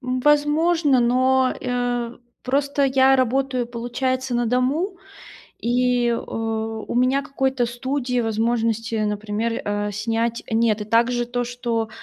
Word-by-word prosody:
возможно, 295 +3 +2
но, 255 +2 +3
э, 245 -1 -2 0.3
просто 280 +2 0
я 265 0 +4
работаю, 255 0 0
получается, 245 +2 -2
на 240 -1 +1
дому. 280 - 0 0.6
И, 245 0 +1
э, 235 - +1
у 225 0 -4
меня 255 +3 +3
какой-то 265 -2 -1
студии, 250 +1 -2
возможности, 225 0 0
например, 215 +2 -2
э, 205 0 -1
снять 225 +3 -2
нет. 225 -2 +2
И - - -4
также 240 +2 +2
то, 245 0 -2
что, 235 -2 -2
245 Hz, 120 wpm, -22 LUFS, 230-260 Hz, 0.6 s, я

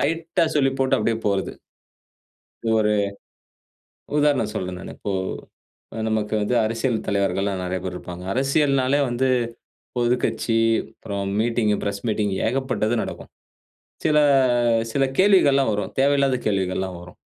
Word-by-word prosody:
லைட்‌டா 165 +3 0
சொல்லி 135 -2 +3
போட்டு 130 - +3
அப்படியே 115 +1 0
போறது. 100 -1 0 1.1
இது 115 - +1
ஒரு 105 - +2 1.3
உதாரணம் 145 -7 +2
சொல்றேன் 90 -2 -3
நானு. - - -8
இப்போ 100 - -4 1.0
நமக்கு 110 -1 -1
வந்து 115 +4 0
அரசியல் 115 +2 -1
தலைவர்கள்லாம் 100 -1 0
நிறைய 90 0 -2
பேர் 90 -1 -4
இருப்பாங்க. 90 0 -8
அரசியல்னாலே 135 0 +2
வந்து 125 +2 0 0.7
பொதுக்கட்சி, 120 -1 0 0.4
அப்புறம் 100 -2 -4
மீட்டிங், 115 -1 +1
பிரஸ் 100 -1 -3
மீட்டிங் 105 -2 0
ஏகப்பட்டது 120 -3 0
நடக்கும். - - -7 0.7
சில 150 -1 +3 0.7
சில 135 +2 +1
கேள்விகள்லாம் 145 - +4
வரும். 105 -1 -2
தேவையில்லாத 140 -1 +3
கேள்விகள்லாம் 95 -2 -1
வரும். 85 0 -13
115 Hz, 120 wpm, -23 LUFS, 100-135 Hz, 1.3 s, கேள்விகள்லாம்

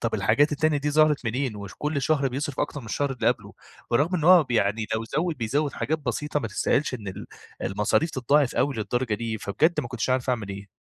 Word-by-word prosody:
طب - - -1
الحاجات 145 +7 +3
التانية 155 0 +1
دي 145 +1 -1
ظهرت 150 -3 +3
منين؟ 120 0 -2
وش 100 -1 -8
كُلّ 150 -2 -1
شهر 140 -4 +2
بيصرف 140 +2 -3
أكتر 145 - -2
من 115 - -11
الشهر 140 +5 -1
اللي 125 - +1
قبله، - - -2 0.4
برغم 150 +10 +2
إن 155 - -2
هو 175 -3 +7
ب 130 - -20
يعني 110 -1 +1
لو 110 - -2
زوّد 155 +7 -1
بيزوّد 140 +5 -1
حاجات 155 +1 -1
بسيطة 145 +2 -2
ما 115 - -3
تستهالش 130 +6 0
إن 105 -5 -6
ال 95 - -7 0.4
المصاريف 105 - +1
تتضاعف 135 +1 +2
أوي 140 -1 +1
للدرجة 120 +1 -1
دي، 110 0 -3
فبجد 150 - +1
ما 125 - -6
كنتش 125 +1 -2
عارف 130 0 +1
أعمل 110 -5 -2
إيه. 100 +1 -7
130 Hz, 220 wpm, -25 LUFS, 110-150 Hz, 0.4 s, هو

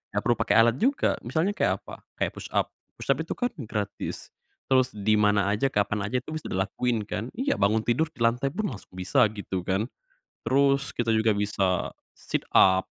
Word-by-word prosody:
ngak - - +2
perlu 120 0 +3
pake 100 - +2
alat 115 +2 +5
juga. 275 +5 +1
Misalnya 160 - 0
kayak 205 - 0
apa, - - -10 0.2
kayak - - -1
push - - -8
up, - - +1 0.2
push - - -1
up - - +1
itu - - -3
kan 245 0 -1 0.2
gratis, 105 -2 -4 0.4
terus 130 -3 +3
di 105 +1 +2
mana 105 -1 +3
aja 105 +6 +1
kapan 105 -3 0
aja 125 +3 -1
itu 155 - -9
bisa - - -9
dilakuin 105 +4 -1
kan, 105 +2 -4
iya 275 +4 -1
bangun 110 +2 +2
tidur 125 +8 +1
di 120 - -2
lantai 120 +4 +2
pun 200 +8 -2
langsung 100 -5 -11
bisa 110 +7 +3
gitu 95 -2 -3
kan. 100 +5 0 0.5
Terus 140 +1 +2
kita 120 -1 -1
juga 110 -1 +3
bisa 100 -3 0 0.2
sit - - -4
up 95 0 +6
115 Hz, 195 wpm, -26 LUFS, 100-130 Hz, 0.5 s, up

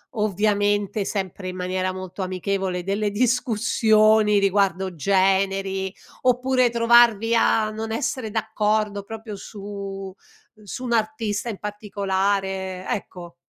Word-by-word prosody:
ovviamente 205 -1 +1
sempre 190 -2 -4
in 185 - -6
maniera 185 0 -2
molto 185 +1 -6
amichevole, 185 0 -2
delle 205 +2 -1
discussioni 220 -2 +3
riguardo 190 -2 +1
generi, 195 +2 +1 0.3
oppure 255 0 +2
trovarvi 235 -1 +4
a 220 -1 +3
non 220 +1 -5
essere 225 0 -2
d'accordo 215 -1 0
proprio 220 0 -8
su 195 -1 -7 0.5
su 205 +5 -7
un 240 -2 -1
artista 220 -1 -1
in 210 - -6
particolare? 195 -2 -2
Ecco. 175 -4 -5
205 Hz, 105 wpm, -23 LUFS, 190-220 Hz, 0.5 s, trovarvi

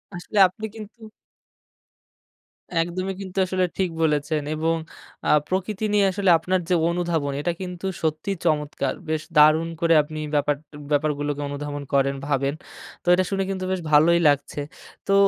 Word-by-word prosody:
আসলে 175 +4 -6
আপনি 220 +4 -8
কিন্তু 220 +1 -11 1.7
একদমই, 180 +3 -1
কিন্তু 190 0 -9
আসলে 185 0 0
ঠিক 190 -2 +1
বলেছেন 150 0 +1
এবং 165 +1 +1 0.5
আ - - +2 0.2
প্রকৃতি 195 +3 -2
নিয়ে 205 -1 +4
আসলে 195 -1 0
আপনার 185 +3 0
যে 180 - +4
অনুধাবন। 170 -5 -1
এটা 175 - 0
কিন্তু 180 0 -6 0.2
সত্যিই 160 +4 -1
চমৎকার! 150 -3 0 0.2
বেশ 155 -1 0 0.2
দারুণ 155 +2 +6
করে 165 0 +4
আপনি 155 +1 -7 0.2
ব্যাপার 145 0 +2 0.4
ব্যাপারগুলোকে 145 0 0
অনুধাবন 145 0 -5
করেন, 140 0 +2
ভাবেন, 140 0 0 0.5
তো - - -24
এটা 185 +1 +3
শুনে 195 -1 0
কিন্তু 190 -1 -3
বেশ 185 - 0
ভালোই 165 +3 +5
লাগছে। 145 0 +1 0.5
তো 195 - +2
165 Hz, 145 wpm, -24 LUFS, 150-185 Hz, 1.7 s, দারুণ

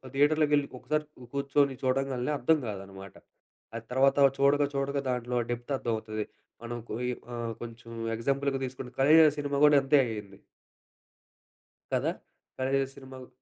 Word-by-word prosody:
థియేటర్‌లోకి 150 +1 +3
వెళ్లి 145 -1 +1
ఒకసారి 150 +4 -1 0.3
కూర్చొని 140 0 +2
చూడంగానే 130 0 0
అర్థం 160 +6 +3
కాదనమాట. 95 -1 -8 0.6
అది 115 0 -6
తర్వాత, 135 +2 +5
తర్వాత 140 -2 +5
చూడగా, 140 +1 +4
చూడగా 140 0 -1
దాంట్లో 125 0 -1
డెప్త్ 120 +3 -5
అర్థమవుతది. 110 -3 -3 0.4
మనం 120 0 -5
కుయ్ 125 +2 -2 0.3
ఆహ్, 115 -1 -3
కొంచెం 115 0 -10 0.3
ఎగ్జాంపుల్‌గా 135 +3 0
తీసుకుంటే 130 -1 -8
ఖలేజా 155 +3 +7
సినిమా 145 -1 -1
కూడా 150 -1 +6
అంతే 145 +2 +4
అయింది. 105 -4 -7 1.6
కదా! - - +1 0.5
ఖలేజా 135 +1 +1
సినిమా 130 -1 -11
వు 125 - -11
130 Hz, 135 wpm, -29 LUFS, 120-140 Hz, 1.6 s, ఖలేజా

